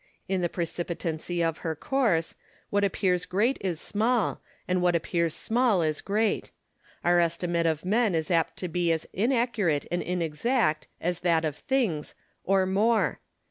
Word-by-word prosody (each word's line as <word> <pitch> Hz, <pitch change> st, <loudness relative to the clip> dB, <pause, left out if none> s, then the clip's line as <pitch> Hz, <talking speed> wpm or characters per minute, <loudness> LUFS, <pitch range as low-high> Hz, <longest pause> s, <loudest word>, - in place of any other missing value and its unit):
In 190 Hz, -1 st, 0 dB
the 175 Hz, -, 0 dB
precipitancy 170 Hz, 0 st, -3 dB
of 165 Hz, -1 st, -1 dB
her 160 Hz, -1 st, -3 dB
course, 205 Hz, -, +1 dB, 0.4 s
what 200 Hz, 0 st, +2 dB
appears 180 Hz, -2 st, +1 dB
great 215 Hz, +10 st, +1 dB
is 180 Hz, -5 st, -2 dB
small, 220 Hz, +4 st, 0 dB, 0.3 s
and 180 Hz, 0 st, +1 dB
what 175 Hz, -1 st, +3 dB
appears 170 Hz, -1 st, 0 dB
small 230 Hz, -6 st, +2 dB
is 155 Hz, -1 st, -1 dB
great. 210 Hz, +2 st, 0 dB, 0.5 s
Our 175 Hz, 0 st, +4 dB
estimate 170 Hz, 0 st, +1 dB
of 160 Hz, +1 st, -1 dB
men 215 Hz, -1 st, +2 dB
is 160 Hz, +1 st, -1 dB
apt 165 Hz, -2 st, +1 dB
to 180 Hz, -, -3 dB
be 175 Hz, 0 st, 0 dB
as 160 Hz, -1 st, -1 dB
inaccurate 220 Hz, -, +1 dB
and 175 Hz, -, 0 dB
inexact 175 Hz, -, 0 dB
as 175 Hz, 0 st, -1 dB
that 165 Hz, -2 st, +2 dB
of 150 Hz, -3 st, -2 dB
things, 210 Hz, -, -1 dB, 0.3 s
or 190 Hz, 0 st, +3 dB
more. 215 Hz, +5 st, +2 dB
180 Hz, 155 wpm, -27 LUFS, 165-205 Hz, 0.5 s, Our